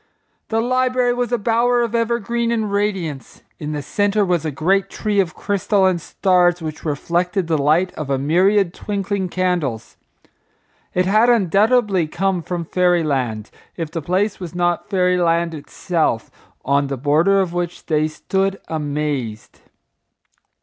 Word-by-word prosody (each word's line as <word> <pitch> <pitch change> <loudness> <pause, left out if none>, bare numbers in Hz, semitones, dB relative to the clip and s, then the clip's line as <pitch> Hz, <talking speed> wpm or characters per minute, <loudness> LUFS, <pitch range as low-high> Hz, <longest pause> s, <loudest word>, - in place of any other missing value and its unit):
The 225 0 0
library 255 0 +1
was 245 -1 -2
a 240 - +2
bower 240 +2 +2
of 235 -1 -3
evergreen 235 0 0
and 220 -3 -1
radiance. 190 - -3 0.2
In 150 -1 -4
the 145 -1 -4
centre 205 +6 +1
was 175 -3 0
a - - 0
great 190 +7 +1
tree 210 -2 -1
of 180 -4 0
crystal 200 0 +1
and 180 -2 +1
stars 180 0 +2
which 160 -2 -6
reflected 175 +5 -1
the 160 -2 0
light 160 +6 +2
of 155 -3 -6
a 135 - +1
myriad 180 +6 +2
twinkling 200 -2 -3
candles. 175 -11 -2 1.0
It 180 0 +2
had 215 +5 +4
undoubtedly 210 -3 +3
come 185 +2 -1
from 170 0 -4
fairy 175 0 +2
land, 125 -8 -2 0.3
if 165 -2 -4
the 165 - -3
place 185 +7 0
was 180 -2 -7
not 175 +1 0
fairy 180 -2 +2
land 170 -1 +1
itself, 155 -4 -2 0.3
on 140 +1 +2
the 135 -1 -3
border 155 +9 +3
of 185 -3 -1
which 175 0 -4
they 155 -1 +1
stood 195 +5 -2
amazed. 145 -7 -3
180 Hz, 150 wpm, -20 LUFS, 155-205 Hz, 1.0 s, had